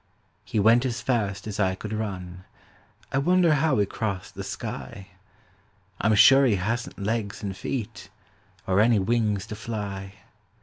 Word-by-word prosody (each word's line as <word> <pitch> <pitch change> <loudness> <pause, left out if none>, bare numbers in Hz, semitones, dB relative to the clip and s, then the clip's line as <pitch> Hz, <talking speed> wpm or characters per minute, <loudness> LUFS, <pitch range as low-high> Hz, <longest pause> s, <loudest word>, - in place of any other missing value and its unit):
He 110 - -2
went 115 +4 +5
as 125 -3 -2
fast 100 -6 -1
as 105 -1 -5
I 95 -2 +2
could 110 +3 -6
run; 95 -4 -5 0.7
I 135 - +1
wonder 175 +2 +4
how 150 -1 +2
he 105 - +3
crossed 100 -1 -4
the - - -6
sky? 95 -1 -7 0.9
I'm 110 +1 +3
sure 135 +6 +7
he 120 -6 +3
hasn't 115 +6 -3
legs 105 0 -3
and 100 -2 -3
feet 115 +1 -5 0.6
Or 95 +1 +2
any 115 +1 +5
wings 105 -1 0
to 110 - -7
fly. 100 -3 -5
105 Hz, 150 wpm, -25 LUFS, 100-120 Hz, 0.9 s, sure